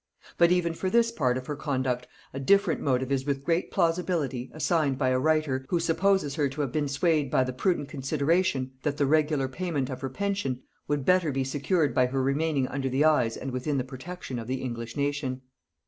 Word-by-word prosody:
But 170 0 +6
even 175 -2 +2
for 185 +3 -2
this 230 +2 +3
part 130 - +1
of 130 - -6
her 145 - -4
conduct 130 -4 -2 0.3
a 135 - -4
different 195 +5 +3
motive 130 -1 0
is 135 -1 +1
with 140 -1 -2
great 170 +3 0
plausibility 165 -7 0
assigned 155 -4 +1
by 130 -2 +1
a 130 0 +2
writer, 155 -3 +1
who 175 - +1
supposes 170 -2 +2
her 145 -1 +1
to 145 +3 -4
have 140 -4 -2
been 150 0 0
swayed 150 0 +1
by 130 - +3
the 130 0 -3
prudent 160 +2 0
consideration, 145 0 0
that 145 0 -1
the 145 - +2
regular 150 -1 +2
payment 145 -2 -2
of 130 0 -6
her 135 - -3
pension 195 -6 -2 0.2
would 145 -2 -1
better 180 -4 +3
be 135 0 0
secured 145 +4 0
by 125 -1 +3
her 130 +1 -1
remaining 140 0 +1
under 135 -1 -2
the 135 +4 +2
eyes 125 -8 +3
and 135 - -5
within 130 +3 -1
the 130 - 0
protection 130 +1 -7
of 115 - -7
the 130 +1 -3
English 115 0 -5
nation. 140 -2 -2
140 Hz, 210 wpm, -27 LUFS, 130-165 Hz, 0.3 s, But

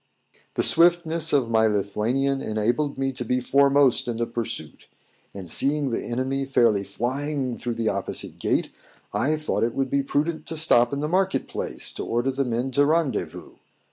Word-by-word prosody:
The - - +1
swiftness 165 -1 +4
of 130 -5 +1
my 110 0 +4
Lithuanian 110 +7 0
enabled 120 +7 -1
me 135 0 -1
to 125 -1 -5
be 125 +2 0
foremost 140 0 +3
in 120 -2 -2
the 120 - 0
pursuit; 115 -8 -5 0.5
and 95 -3 -7
seeing 140 - 0
the - - -2
enemy 130 +3 -2
fairly 115 -7 +2
flying 130 +5 -3
through 120 0 -4
the 115 -2 0
opposite - - -4
gate, - - 0 0.4
I 150 +4 +1
thought 155 0 -2
it 115 0 0
would 135 -1 -1
be 140 - +2
prudent 150 +4 -2
to 160 - -3
stop 120 -6 +4
in 140 0 -3
the 150 - -1
market 190 +3 0
place, - - -3
to - - -5
order 120 +3 0
the 135 +1 -1
men 120 +2 -2
to 145 +3 +3
rendezvous. 155 -7 -2
135 Hz, 175 wpm, -24 LUFS, 115-145 Hz, 0.5 s, swiftness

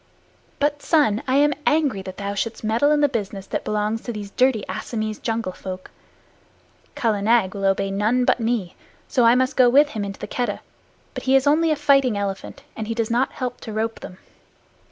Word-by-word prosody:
But, 290 0 0
son, 285 -10 +2
I 260 - +1
am 295 +1 +4
angry 290 -10 +2
that 185 -1 -9
thou 200 0 -3
shouldst 225 +3 -3
meddle 225 +7 +2
in 300 0 +3
the 290 - +5
business 205 -6 -4
that - - -3
belongs 215 +1 -1
to 240 - -5
these 205 -3 -7
dirty 250 -4 +2
Assamese 215 +3 -4
jungle 225 -4 -2
folk. 185 0 -8 1.0
Kala 220 -4 0
Nag 220 -3 +2
will 195 -1 -3
obey 195 0 +1
none 220 +6 +1
but - - +2
me, 225 -6 -1 0.3
so 245 -4 +2
I 230 +1 +6
must 260 +2 +1
go 250 -2 +6
with 290 +4 +5
him 215 -7 -4
into 195 -1 -6
the - - -5
Keddah, 240 -5 -3 0.5
but - - -7
he 265 +1 +4
is 270 0 +4
only 315 +3 +3
a 310 - +2
fighting 275 -6 +3
elephant, 195 -1 -5
and 220 - -5
he 230 - -3
does 230 -1 -1
not 245 +3 +1
help 250 -2 -5
to 225 - -7
rope 225 +1 -2
them. 185 - -10
230 Hz, 205 wpm, -22 LUFS, 205-260 Hz, 1.0 s, I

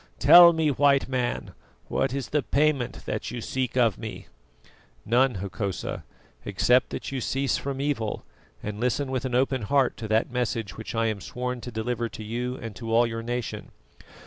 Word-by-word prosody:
Tell 175 0 +9
me, 160 -2 +1
White 140 0 +3
Man, 125 -2 -2 0.4
what 135 - 0
is 135 -1 -3
the 150 - +1
payment 140 -3 0
that - - -3
you 120 +1 -5
seek 130 +2 -2
of 115 -6 +3
me?" - - -7 0.8
"None, 125 +2 +3
Hokosa, 100 +1 -4 0.4
except 125 +1 +2
that - - -5
you 135 -2 -3
cease 135 +3 0
from 135 -1 -4
evil 135 -7 -2 0.4
and 105 0 -5
listen 130 +3 0
with 130 -1 -2
an 125 -2 -2
open 130 0 +1
heart 130 +5 +1
to 110 - -5
that 110 +3 +1
message 115 -6 -2
which 110 +1 -7
I 115 0 +1
am 110 -3 -1
sworn 125 +2 -4
to 125 - -7
deliver 115 +1 -2
to 110 - -8
you 120 +3 -3
and 115 -4 -8
to 115 -1 -5
all 115 +1 +5
your 115 -1 -4
nation. 120 0 -4
125 Hz, 180 wpm, -26 LUFS, 115-135 Hz, 0.8 s, Tell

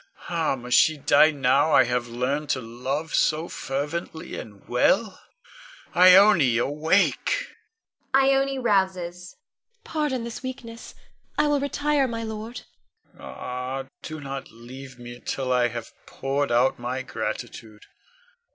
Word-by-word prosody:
Ah, 165 -5 0
must 125 -1 -1
she 155 -1 +3
die 155 +2 +5
now 140 +1 +2
I 130 - +7
have 125 -1 -1
learned 130 +5 -2
to 135 - +1
love 130 +7 -4
so 155 +2 +2
fervently 160 +5 -4
and 100 -3 -10
well? 190 - +1 0.7
Ione, 180 - +7
awake! 160 - +1 0.7
[Ione 270 0 +3
rouses. 190 -6 -1
Ione. 470 0 -47
Pardon 295 -6 -2
this 235 0 -6
weakness; 245 -3 -8 0.4
I 300 - +3
will 295 -1 +2
retire, 285 0 +1
my 230 -1 -4
lord. 220 +1 -6 0.5
Con. - - -23
Ah, 125 +2 -5 0.2
do 155 0 -7
not 135 -1 -6
leave 125 +3 -11
me 120 0 -10
till 130 -2 -2
I 125 -1 +3
have 120 -1 -7
poured 140 0 -2
out 120 +2 +2
my 125 +2 -3
gratitude. 110 -3 -6
150 Hz, 130 wpm, -25 LUFS, -, 0.7 s, I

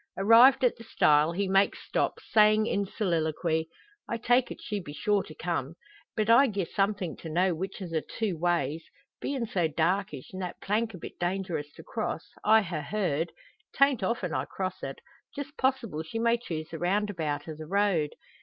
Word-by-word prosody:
Arrived 230 +7 +7
at 250 - +4
the 230 - -11
stile, 150 -7 +3
he 195 +3 -1
makes 195 +1 +3
stop, - - 0 0.2
saying 215 0 +5
in 200 -3 0
soliloquy: 160 -4 -1 0.4
"I 235 - -1
take 245 +2 +2
it - - -7
she 210 -2 -3
be 145 -6 -8
sure 205 +4 +1
to 155 - -11
come; 165 -3 -3 0.4
but 215 -1 +1
I'd 235 +1 +6
gi'e 195 -3 0
something 195 -4 0
to 165 - -8
know 180 +3 +2
which 185 +4 -5
o' - - -5
the 165 -2 -1
two 210 0 -3
ways. 165 -2 0 0.4
Bein' 270 -4 -2
so 180 -6 0
darkish, 160 -1 -1
an' 185 - -6
that 180 -2 -5
plank 220 +1 -1
a - - -8
bit - - -10
dangerous 175 -5 -2
to - - -12
cross, 220 -7 -3 0.2
I 220 0 +6
ha' 170 -5 -3
heard 170 -3 -1 0.4
'tan't 275 -4 +4
often 190 -4 -1
I - - -1
cross 185 -1 -4
it 135 - -6 0.3
just 285 +1 -6
possible 250 - 0
she 160 +7 -6
may 230 +1 +3
choose 160 -8 -5
the 165 - -6
roundabout 175 -6 -1
o' 160 - -4
the 155 0 -9
road. 190 -5 +1
190 Hz, 190 wpm, -28 LUFS, 160-215 Hz, 0.4 s, Arrived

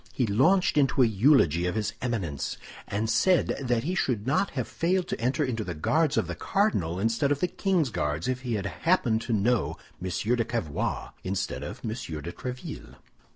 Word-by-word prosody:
He 125 - +1
launched 150 - +3
into 135 -1 +4
a - - +6
eulogy 100 - +4
of 90 - -2
his 110 -1 -1
Eminence, 100 - -2 0.3
and 105 +3 -1
said 165 +11 +3
that 120 -3 0
he 175 +6 -1
should 125 - 0
not 140 +9 +2
have 125 - -1
failed 180 +1 0
to - - -3
enter 130 +5 +1
into 115 -4 -2
the 90 -4 -5
Guards 155 - +1
of - - +2
the - - -4
cardinal 95 - 0
instead 115 +7 +1
of 145 - +1
the 180 - +2
king's 175 - 0
Guards 75 -1 -1
if 130 0 -1
he 120 -3 -2
had 100 -2 -3
happened 115 - +1
to 120 - -4
know 110 0 +1 0.3
M. 95 - -2
de 115 +6 +1
Cavois 100 -11 -3
instead 95 +1 -2
of - - -7
M. - - -1
de 110 - -3 0.4
Tréville. 125 +6 -7
120 Hz, 195 wpm, -27 LUFS, 100-145 Hz, 0.4 s, a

